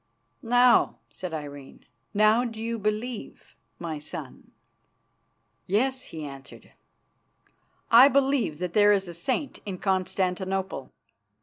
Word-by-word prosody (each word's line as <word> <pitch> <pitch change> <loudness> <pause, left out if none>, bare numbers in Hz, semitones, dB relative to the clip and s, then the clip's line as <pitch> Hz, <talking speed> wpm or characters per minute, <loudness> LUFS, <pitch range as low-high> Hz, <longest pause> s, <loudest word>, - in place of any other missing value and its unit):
"Now," 245 +1 +4 0.2
said 185 -2 -6
Irene, 145 -3 -8 0.3
"now 215 +3 +4
do 225 -3 -5
you 230 +1 -3
believe, 215 - -4 0.2
my 160 -3 -5
son?" 150 - -9 1.2
"Yes," 255 +6 0
he 160 -1 -8
answered, 135 -1 -11 1.2
"I 245 +4 +9
believe 275 - +1
that 180 0 -4
there 205 -1 +6
is 195 -2 0
a 175 - -7
saint 260 - -3
in 195 -3 -5
Constantinople. 190 0 -1
205 Hz, 110 wpm, -26 LUFS, 175-235 Hz, 1.2 s, I